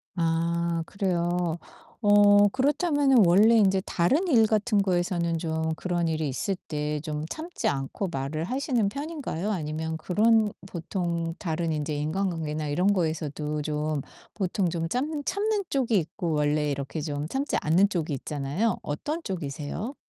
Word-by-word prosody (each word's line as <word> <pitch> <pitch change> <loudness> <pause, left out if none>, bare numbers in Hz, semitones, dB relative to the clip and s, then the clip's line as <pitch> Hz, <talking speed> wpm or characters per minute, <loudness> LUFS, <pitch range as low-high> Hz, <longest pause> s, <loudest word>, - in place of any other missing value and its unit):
아 170 0 0
그래요. 175 -3 -1 0.4
어 205 0 +6
그렇다면은 275 - +3
원래 210 +7 +6
인제 195 -2 +4
다른 275 - +1
일 230 -8 +5
같은 210 -1 +2
거에서는 175 -2 0
좀 160 -1 -1
그런 175 -1 -1
일이 155 -2 -1
있을 190 +9 -2
때 150 -1 -2 0.2
좀 155 -1 -3
참지 330 +2 -4
않고 140 +8 -2
말을 140 +3 -3
하시는 255 - 0
편인가요? 275 - -4
아니면 160 -2 -3
그런 215 +5 +3 0.2
보통 170 -1 -3
다른 165 -2 -2
인제 150 0 -2
인간관계나 155 -1 -2
이런 180 +7 +2
거에서도 155 -3 -2
좀 150 -1 -2 0.3
보통 190 -2 0
좀 165 -1 -2
짬 290 +4 -2
참는 415 0 0
쪽이 245 -6 +1
있고 170 0 -2
원래 150 0 +1
이렇게 140 +3 -4
좀 145 0 -3
참지 270 - -1
않는 180 +6 +4
쪽이 165 -6 -2
있잖아요. 150 - -1
어떤 295 - -3
쪽이세요? 170 - -4
175 Hz, 300 characters per minute, -27 LUFS, 155-210 Hz, 0.4 s, 어